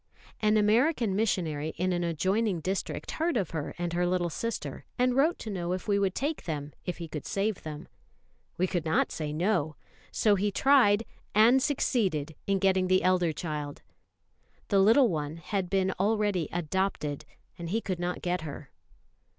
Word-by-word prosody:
An 215 0 +3
American 225 +1 +3
missionary 160 -8 -1
in 185 +1 0
an 175 0 -1
adjoining 185 +4 0
district 190 +4 -3
heard 330 -2 0
of 195 -7 -1
her 155 -3 -4
and 175 -1 -3
her 175 +1 +1
little 175 -1 0
sister, 230 +7 -4
and 250 0 +2
wrote 305 +6 +3
to 220 - -6
know 180 -2 -2
if 185 - -5
we 200 -1 +2
would 195 -2 0
take 290 +4 -2
them 150 -3 -4
if 180 - -3
he 170 - -6
could 150 -2 -6
save 200 0 -1
them. 150 -1 -7 0.7
We 185 - +2
could 175 -3 -1
not 160 0 +1
say 150 -2 -3
No; 160 -2 0 0.4
so 210 - +3
he 200 +1 +1
tried, 230 -4 +4 0.3
and 235 +5 +6
succeeded 195 - 0
in 195 0 +2
getting 190 -1 +2
the 185 0 +3
elder 180 -2 +3
child; 150 -2 -5 0.9
the 200 - +4
little 230 +6 +6
one 155 -2 -3
had 185 +2 -3
been 190 0 +1
already 205 -4 +1
"adopted," 175 -3 -2 0.4
and 170 -1 -5
he 220 +5 +1
could 185 -5 -4
not 175 0 -3
get 180 0 0
her. 150 -3 -8
185 Hz, 175 wpm, -29 LUFS, 165-210 Hz, 0.9 s, and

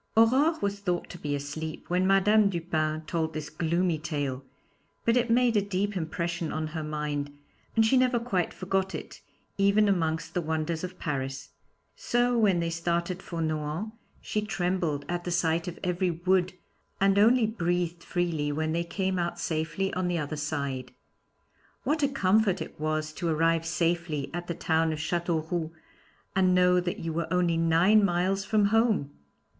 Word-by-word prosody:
Aurore 270 +8 +4
was 200 0 -1
thought 180 -3 -2
to 175 - -9
be 145 -2 -2
asleep 145 +3 -5
when 180 +1 +1
Madame 200 +2 +5
Dupin 160 -3 -1
told 160 -2 -2
this 150 -1 -5
gloomy 170 +1 0
tale, 145 -4 -3 0.6
but 230 - +3
it 245 -1 +2
made 240 0 +3
a 205 - +4
deep 200 +1 -2
impression 170 -1 -2
on 155 0 -2
her 155 0 -4
mind, 150 -1 -3 0.4
and 225 -1 +5
she 260 +4 +4
never 255 -1 +3
quite 195 -7 -1
forgot 190 0 -1
it, - - -8 0.4
even 200 +2 +4
amongst 165 -3 0
the 175 - 0
wonders 160 +1 -2
of 185 0 -6
Paris. 135 -2 -4 0.5
So 245 0 +1
when 205 -6 +3
they 170 0 -1
started 170 +2 -1
for 170 -3 -4
Nohant 155 +6 -2 0.3
she 210 - -2
trembled 180 -7 -1
at 175 0 -2
the 175 - -4
sight 170 0 +1
of 175 - -5
every 180 +1 0
wood, 180 +2 +1 0.5
and 195 0 +4
only 230 +3 +5
breathed 175 -5 -1
freely 165 -5 -1
when 155 +2 -1
they 170 +1 0
came 190 +1 -2
out 170 0 -2
safely 160 +4 -2
on 185 0 -1
the 175 -1 0
other 150 -1 -3
side. 140 -4 -3 0.9
What 305 +1 0
a 285 - +4
comfort 200 -5 +2
it - - -7
was 155 0 -1
to 170 +1 -3
arrive 165 +1 +2
safely 165 -4 -1
at 175 0 -4
the 170 - -3
town 160 -1 +1
of - - -4
Châteauroux, 165 +1 -1 0.7
and 185 -1 +4
know 180 0 +5
that 175 0 -2
you 165 -1 -3
were 165 0 -3
only 175 -2 +2
nine 165 +6 +4
miles 190 +1 +1
from 210 -1 +2
home! 220 -11 +2
175 Hz, 170 wpm, -28 LUFS, 160-195 Hz, 0.9 s, Madame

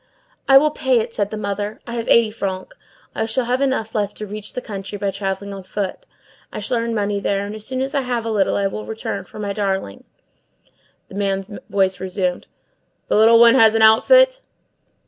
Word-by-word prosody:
"I 270 - +8
will 300 +2 +4
pay 265 -4 +1
it," 230 +1 -4
said 205 -1 -1
the 215 - -5
mother. 205 +1 -4
"I 235 - -7
have 230 -1 -4
eighty 230 -2 +4
francs. 190 -3 -5 0.4
I 220 - -2
shall 240 +3 -1
have 250 +3 0
enough 260 -5 -1
left 205 -2 -2
to 215 - -5
reach 210 +1 -7
the - - -3
country, 200 -2 -7
by 200 0 -2
travelling 195 0 -4
on 195 - -7
foot. 190 +1 -5 0.4
I - - -6
shall 250 - -1
earn 230 0 -2
money 205 -1 -1
there, 200 0 -1
and 205 - -6
as 215 0 -8
soon 260 0 -3
as 270 +1 -3
I 280 - +1
have 245 -3 -3
a 225 - -2
little 200 -3 +1
I 200 - 0
will 195 +2 -3
return 220 0 -5
for - - -14
my 205 -1 -3
darling." 195 - -3 1.0
The - - -13
man's 195 -1 -1 0.2
voice 190 -1 +1
resumed:— 185 -1 -2 0.6
"The - - +2
little 225 +2 +6
one 235 0 +8
has 225 -4 +5
an 225 - +3
outfit?" - - +5
215 Hz, 210 wpm, -20 LUFS, 200-235 Hz, 1.0 s, I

